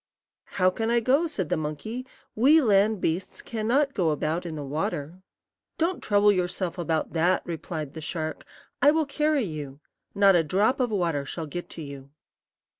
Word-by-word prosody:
"How 185 Hz, -1 st, +4 dB
can 225 Hz, +4 st, -2 dB
I 235 Hz, 0 st, +3 dB
go?" 270 Hz, +8 st, +2 dB
said 190 Hz, -, -3 dB
the 180 Hz, -, +1 dB
monkey; 155 Hz, -, -5 dB, 0.3 s
"we 280 Hz, +8 st, +5 dB
land 210 Hz, -, +3 dB
beasts 170 Hz, +4 st, -2 dB
can 220 Hz, -2 st, -4 dB
not 275 Hz, +3 st, +2 dB
go 175 Hz, -4 st, +1 dB
about 155 Hz, +3 st, -1 dB
in 160 Hz, -, -5 dB
the 150 Hz, -, -5 dB
water." 150 Hz, +4 st, -3 dB, 0.6 s
"Don't 345 Hz, +3 st, 0 dB
trouble 205 Hz, 0 st, +4 dB
yourself 180 Hz, -1 st, -2 dB
about 160 Hz, -2 st, -1 dB
that," 170 Hz, +3 st, +2 dB
replied 160 Hz, -3 st, -5 dB
the 160 Hz, -, -7 dB
shark; 155 Hz, 0 st, -4 dB, 0.4 s
"I 285 Hz, -, +7 dB
will 315 Hz, +1 st, +2 dB
carry 300 Hz, 0 st, +1 dB
you. 145 Hz, -5 st, -6 dB, 0.4 s
Not 200 Hz, -1 st, +6 dB
a 170 Hz, -, +4 dB
drop 205 Hz, -, +1 dB
of 250 Hz, -2 st, +1 dB
water 170 Hz, -8 st, 0 dB
shall 160 Hz, +4 st, -5 dB
get 175 Hz, +4 st, -6 dB
to 160 Hz, -, -5 dB
you." 140 Hz, -1 st, -9 dB
185 Hz, 180 wpm, -26 LUFS, 160-230 Hz, 0.6 s, I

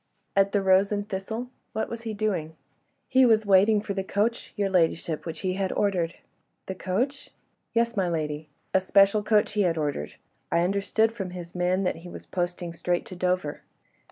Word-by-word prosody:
"At 195 Hz, 0 st, +4 dB
'The 200 Hz, -1 st, +1 dB
Rose 190 Hz, +1 st, +4 dB
and 205 Hz, 0 st, -2 dB
Thistle'? 220 Hz, +6 st, -4 dB, 0.2 s
What 220 Hz, -, -1 dB
was 230 Hz, 0 st, -6 dB
he 225 Hz, -2 st, -4 dB
doing?" 190 Hz, -7 st, -1 dB, 0.5 s
"He 260 Hz, 0 st, +5 dB
was 220 Hz, -3 st, +4 dB
waiting 205 Hz, +2 st, +5 dB
for 205 Hz, -1 st, -4 dB
the 195 Hz, -1 st, -2 dB
coach, 215 Hz, +4 st, -1 dB
your 205 Hz, -2 st, +1 dB
ladyship, 165 Hz, -3 st, +1 dB
which 165 Hz, -, -5 dB
he 185 Hz, -1 st, 0 dB
had 190 Hz, 0 st, -1 dB
ordered." 180 Hz, -5 st, 0 dB, 0.5 s
"The 190 Hz, -, -4 dB
coach?" 240 Hz, +10 st, -2 dB, 0.4 s
"Yes, 235 Hz, 0 st, +1 dB
my 190 Hz, -3 st, +1 dB
lady. 155 Hz, -2 st, -3 dB, 0.2 s
A 190 Hz, -, +4 dB
special 195 Hz, +2 st, +4 dB
coach 210 Hz, 0 st, +2 dB
he 210 Hz, -, +1 dB
had 170 Hz, -4 st, +2 dB
ordered. 145 Hz, -, -2 dB, 0.4 s
I 170 Hz, -, +3 dB
understood 200 Hz, +4 st, +2 dB
from 200 Hz, -5 st, -5 dB
his 175 Hz, 0 st, -8 dB
man 180 Hz, +2 st, +1 dB
that 180 Hz, -, 0 dB
he 170 Hz, +2 st, -10 dB
was -, -, -9 dB
posting 175 Hz, -1 st, -3 dB
straight 175 Hz, +1 st, -1 dB
to 185 Hz, -, -9 dB
Dover." 180 Hz, -4 st, -1 dB
190 Hz, 185 wpm, -26 LUFS, 175-210 Hz, 0.5 s, He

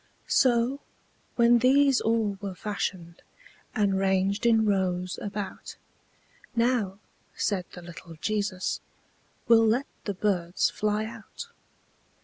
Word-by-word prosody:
So, 250 Hz, +2 st, +2 dB, 0.6 s
when 235 Hz, 0 st, +5 dB
these 270 Hz, +1 st, +4 dB
all 220 Hz, -3 st, +1 dB
were 195 Hz, -2 st, -5 dB
fashioned, 185 Hz, -4 st, -4 dB, 0.5 s
And 200 Hz, -4 st, +2 dB
ranged 195 Hz, +3 st, +1 dB
in 225 Hz, -1 st, +4 dB
rows 185 Hz, -3 st, 0 dB
about, 200 Hz, -2 st, -6 dB, 0.8 s
"Now," 230 Hz, -5 st, +1 dB, 0.4 s
said 190 Hz, -4 st, -1 dB
the 180 Hz, -, -10 dB
little 170 Hz, -1 st, -11 dB
Jesus, 200 Hz, +1 st, -2 dB, 0.7 s
"We'll 225 Hz, -1 st, +6 dB
let 245 Hz, +5 st, +2 dB, 0.2 s
the 205 Hz, -, -2 dB
birds 180 Hz, -3 st, 0 dB
fly 210 Hz, 0 st, -1 dB
out." 230 Hz, -, -9 dB
205 Hz, 110 wpm, -27 LUFS, 190-230 Hz, 0.8 s, We'll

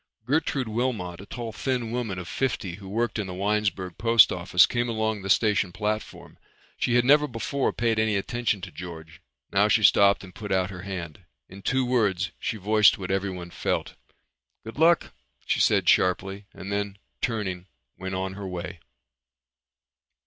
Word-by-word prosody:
Gertrude 140 Hz, -2 st, 0 dB
Wilmot, 110 Hz, -6 st, -2 dB
a 100 Hz, -, -12 dB
tall 120 Hz, -2 st, -5 dB
thin 120 Hz, 0 st, -2 dB
woman 115 Hz, -6 st, -3 dB
of 90 Hz, -1 st, -6 dB
fifty 95 Hz, -7 st, -2 dB
who 100 Hz, -2 st, -10 dB
worked 115 Hz, +2 st, -1 dB
in 100 Hz, -, -2 dB
the 90 Hz, -, -6 dB
Winesburg 100 Hz, -3 st, -1 dB
post 115 Hz, -1 st, +6 dB
office, 90 Hz, 0 st, +4 dB
came 120 Hz, 0 st, -1 dB
along 110 Hz, -2 st, -1 dB
the 95 Hz, -, -6 dB
station 105 Hz, -2 st, +3 dB
platform. 105 Hz, +2 st, -4 dB, 0.4 s
She 120 Hz, -, +1 dB
had 120 Hz, 0 st, +4 dB
never 150 Hz, +2 st, +5 dB
before 130 Hz, +3 st, -1 dB
paid 115 Hz, -2 st, 0 dB
any 110 Hz, -1 st, +2 dB
attention 115 Hz, 0 st, -1 dB
to 95 Hz, 0 st, -7 dB
George. 80 Hz, -3 st, -9 dB, 0.3 s
Now 100 Hz, +1 st, +4 dB
she 110 Hz, +1 st, +3 dB
stopped 100 Hz, -1 st, +5 dB
and 95 Hz, -2 st, -12 dB
put 105 Hz, +1 st, -7 dB
out 95 Hz, 0 st, +1 dB
her 90 Hz, -2 st, -8 dB
hand. 90 Hz, -3 st, -7 dB, 0.2 s
In 100 Hz, +1 st, -11 dB
two 130 Hz, +5 st, +1 dB
words 100 Hz, -8 st, +1 dB
she 110 Hz, -, -3 dB
voiced 105 Hz, +1 st, +4 dB
what 95 Hz, -1 st, -5 dB
everyone 95 Hz, -3 st, -3 dB
felt. -, -, -2 dB, 0.7 s
"Good 115 Hz, +5 st, -9 dB
luck," 170 Hz, +1 st, +4 dB, 0.3 s
she -, -, 0 dB
said -, -, +3 dB
sharply 95 Hz, +2 st, +2 dB
and 95 Hz, +1 st, -8 dB
then 100 Hz, -1 st, -2 dB, 0.2 s
turning 95 Hz, -6 st, -2 dB, 0.3 s
went 95 Hz, 0 st, -5 dB
on 95 Hz, 0 st, -3 dB
her 100 Hz, 0 st, -6 dB
way. 90 Hz, -1 st, -6 dB
100 Hz, 170 wpm, -26 LUFS, 95-115 Hz, 0.7 s, post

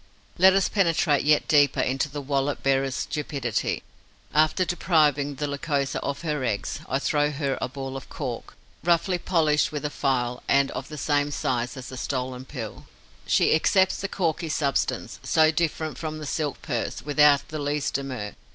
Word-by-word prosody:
Let 190 Hz, +1 st, +7 dB
us 195 Hz, 0 st, +3 dB
penetrate 165 Hz, -7 st, +2 dB
yet 150 Hz, 0 st, +3 dB
deeper 145 Hz, -3 st, +4 dB
into 135 Hz, +3 st, 0 dB
the 145 Hz, 0 st, -6 dB
wallet 140 Hz, 0 st, -1 dB
bearer's 135 Hz, -1 st, +1 dB
stupidity. 140 Hz, -7 st, -2 dB, 0.5 s
After 155 Hz, +5 st, +3 dB
depriving 150 Hz, -5 st, +2 dB
the 145 Hz, +2 st, -2 dB
Lycosa 140 Hz, -1 st, -1 dB
of 140 Hz, +3 st, -4 dB
her 150 Hz, -4 st, -1 dB
eggs, 105 Hz, -5 st, -2 dB
I 135 Hz, -, +1 dB
throw 145 Hz, +1 st, +1 dB
her 140 Hz, -2 st, -2 dB
a -, -, 0 dB
ball 135 Hz, 0 st, -6 dB
of 135 Hz, -, -8 dB
cork, -, -, -6 dB, 0.3 s
roughly 175 Hz, +1 st, +2 dB
polished 150 Hz, -6 st, +2 dB
with 150 Hz, -1 st, -4 dB
a 150 Hz, -, -2 dB
file 125 Hz, -4 st, -1 dB
and 140 Hz, 0 st, +3 dB
of -, -, -5 dB
the 155 Hz, -, -8 dB
same 145 Hz, 0 st, +1 dB
size 125 Hz, -2 st, -2 dB
as 130 Hz, -, -8 dB
the 130 Hz, -, -8 dB
stolen 130 Hz, -1 st, -3 dB
pill. 120 Hz, -6 st, -7 dB, 0.4 s
She -, -, +4 dB
accepts 190 Hz, +4 st, +3 dB
the 195 Hz, -, -1 dB
corky 165 Hz, -3 st, -1 dB
substance, 140 Hz, -3 st, -1 dB
so 155 Hz, -1 st, +4 dB
different 160 Hz, -3 st, -2 dB
from 155 Hz, -1 st, -4 dB
the 155 Hz, -, -7 dB
silk 145 Hz, -1 st, -3 dB
purse, 120 Hz, -5 st, -3 dB
without 145 Hz, -1 st, +4 dB
the 155 Hz, -, -4 dB
least 145 Hz, 0 st, -1 dB
demur. 130 Hz, -7 st, -4 dB
145 Hz, 170 wpm, -25 LUFS, 135-155 Hz, 0.5 s, Let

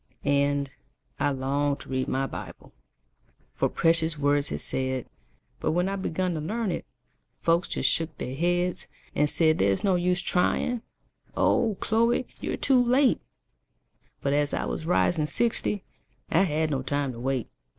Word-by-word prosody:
And, 140 Hz, -1 st, +1 dB, 0.5 s
I -, -, +2 dB
longed 140 Hz, +1 st, -1 dB
to -, -, -12 dB
read 130 Hz, -1 st, -1 dB
my 135 Hz, +1 st, 0 dB
Bible, -, -, -9 dB, 0.8 s
For -, -, 0 dB
precious 165 Hz, -1 st, +2 dB
words 145 Hz, 0 st, +1 dB
it -, -, -1 dB
said; 130 Hz, -1 st, -2 dB, 0.5 s
But -, -, 0 dB
when 175 Hz, +2 st, +1 dB
I 195 Hz, -, -1 dB
begun 185 Hz, -1 st, -1 dB
to 160 Hz, -, -3 dB
learn 215 Hz, +5 st, -2 dB
it, 170 Hz, -, -4 dB, 0.5 s
Folks 170 Hz, +1 st, +2 dB
just -, -, 0 dB
shook 165 Hz, 0 st, +1 dB
their 125 Hz, -, -4 dB
heads, 175 Hz, +4 st, 0 dB, 0.3 s
And 150 Hz, 0 st, +2 dB
said 155 Hz, 0 st, +2 dB
there 100 Hz, -, +3 dB
is 95 Hz, -, -1 dB
no 195 Hz, -, +3 dB
use 180 Hz, 0 st, +2 dB
trying, 200 Hz, +7 st, +1 dB, 0.6 s
Oh! 225 Hz, -5 st, +2 dB
Chloe, 230 Hz, +3 st, +2 dB
you're -, -, -3 dB
too 260 Hz, -3 st, +4 dB
late; 255 Hz, +2 st, +3 dB, 1.0 s
But 140 Hz, -, 0 dB
as 145 Hz, 0 st, +1 dB
I -, -, -2 dB
was 160 Hz, -, -4 dB
rising 170 Hz, -3 st, +2 dB
sixty, 210 Hz, -1 st, +1 dB, 0.5 s
I 170 Hz, +4 st, +4 dB
had 155 Hz, -1 st, 0 dB
no 135 Hz, -2 st, 0 dB
time 140 Hz, +1 st, -1 dB
to 115 Hz, -, -9 dB
wait. 130 Hz, -1 st, -1 dB
160 Hz, 160 wpm, -27 LUFS, 140-185 Hz, 1.0 s, too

